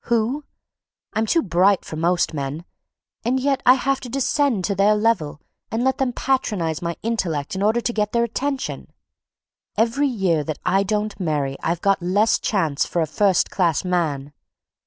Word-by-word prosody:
Who? 235 Hz, +5 st, 0 dB, 0.7 s
I'm 220 Hz, 0 st, 0 dB
too 330 Hz, -, +2 dB
bright 190 Hz, 0 st, +2 dB
for -, -, -7 dB
most 170 Hz, +2 st, +1 dB
men, 145 Hz, +3 st, -4 dB, 0.6 s
and 250 Hz, +3 st, +1 dB
yet 275 Hz, 0 st, 0 dB
I 255 Hz, -, +9 dB
have 270 Hz, +1 st, 0 dB
to 250 Hz, -, -8 dB
descend 270 Hz, -5 st, +1 dB
to 200 Hz, -, 0 dB
their 200 Hz, +2 st, +3 dB
level 210 Hz, -10 st, 0 dB, 0.3 s
and 225 Hz, +2 st, -1 dB
let 265 Hz, 0 st, +1 dB
them 265 Hz, -2 st, +1 dB
patronize 210 Hz, -, -1 dB
my 170 Hz, -1 st, -3 dB
intellect 185 Hz, -8 st, -2 dB
in 190 Hz, -, -3 dB
order 220 Hz, +4 st, +2 dB
to 240 Hz, -, -2 dB
get 210 Hz, -1 st, 0 dB
their 235 Hz, 0 st, +2 dB
attention. 265 Hz, +4 st, -3 dB, 0.9 s
Every 235 Hz, +6 st, +2 dB
year 190 Hz, -, 0 dB
that 155 Hz, 0 st, -4 dB
I 195 Hz, +2 st, +3 dB
don't 210 Hz, +1 st, -2 dB
marry 145 Hz, -6 st, -1 dB
I've 170 Hz, +1 st, -1 dB
got 195 Hz, -1 st, +2 dB
less 200 Hz, +5 st, +2 dB
chance 160 Hz, -9 st, 0 dB
for 170 Hz, -, -1 dB
a -, -, 0 dB
first 190 Hz, +3 st, +1 dB
class 170 Hz, -4 st, +1 dB
man. 150 Hz, -6 st, -1 dB
205 Hz, 175 wpm, -22 LUFS, 170-235 Hz, 0.9 s, I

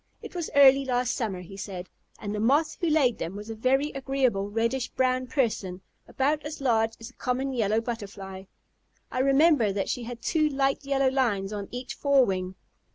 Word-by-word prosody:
"It -, -, -9 dB
was 345 Hz, -3 st, -3 dB
early 275 Hz, -1 st, +7 dB
last 250 Hz, -1 st, 0 dB
summer," 200 Hz, -6 st, -3 dB
he 180 Hz, +2 st, -11 dB
said, 185 Hz, -2 st, -6 dB, 0.3 s
"and 205 Hz, -1 st, -5 dB
the 210 Hz, -, -2 dB
Moth 280 Hz, +8 st, +2 dB
who 340 Hz, -, +1 dB
laid 285 Hz, -6 st, +2 dB
them 170 Hz, +4 st, -4 dB
was 210 Hz, +2 st, -7 dB
a -, -, -5 dB
very 270 Hz, +6 st, +1 dB
agreeable 260 Hz, -7 st, 0 dB
reddish 230 Hz, +4 st, -1 dB
brown 255 Hz, 0 st, 0 dB
person, 210 Hz, -9 st, -1 dB, 0.3 s
about 290 Hz, +3 st, 0 dB
as 295 Hz, +1 st, -6 dB
large 225 Hz, -4 st, +2 dB
as 225 Hz, +2 st, -9 dB
a -, -, -32 dB
common 265 Hz, +1 st, -2 dB
Yellow 220 Hz, -2 st, +1 dB
Butterfly. 200 Hz, -5 st, -7 dB, 0.7 s
I 255 Hz, -, -2 dB
remember 275 Hz, -4 st, +4 dB
that 195 Hz, 0 st, -2 dB
she 250 Hz, -, -2 dB
had 235 Hz, 0 st, -8 dB
two 310 Hz, -2 st, +2 dB
light 275 Hz, 0 st, 0 dB
yellow 275 Hz, -1 st, +2 dB
lines 215 Hz, -7 st, 0 dB
on 200 Hz, -1 st, -5 dB
each 245 Hz, 0 st, -6 dB
forewing. 195 Hz, -11 st, +1 dB
245 Hz, 185 wpm, -27 LUFS, 205-270 Hz, 0.7 s, early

